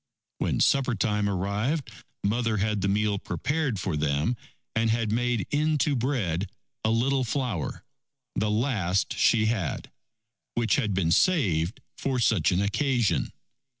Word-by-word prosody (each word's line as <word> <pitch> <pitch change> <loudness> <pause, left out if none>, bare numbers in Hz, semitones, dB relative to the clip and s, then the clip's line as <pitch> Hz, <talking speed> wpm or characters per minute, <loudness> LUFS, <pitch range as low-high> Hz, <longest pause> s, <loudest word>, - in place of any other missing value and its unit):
When - - 0
supper 135 -3 +3
time 105 0 0
arrived, 105 - -1 0.3
Mother 110 +1 +1
had 105 0 0
the 100 - +1
meal 105 0 +1
prepared 130 - -1
for 90 -3 -2
them, 75 +9 0 0.4
and 115 0 +2
had 115 -1 +1
made 120 -2 0
into 150 -1 +2
bread 110 - -1 0.3
a 110 - +2
little 130 +4 +2
flour, 120 - -2 0.5
the 105 +1 0
last 105 -5 0
she 110 -2 +4
had, 110 -8 -2 0.6
which 120 -1 +2
had 105 -8 0
been 85 -3 +1
saved 100 - +2 0.2
for 135 -2 -1
such 105 -8 +3
an 90 +2 +2
occasion. 120 +1 +1
110 Hz, 135 wpm, -27 LUFS, 100-125 Hz, 0.6 s, she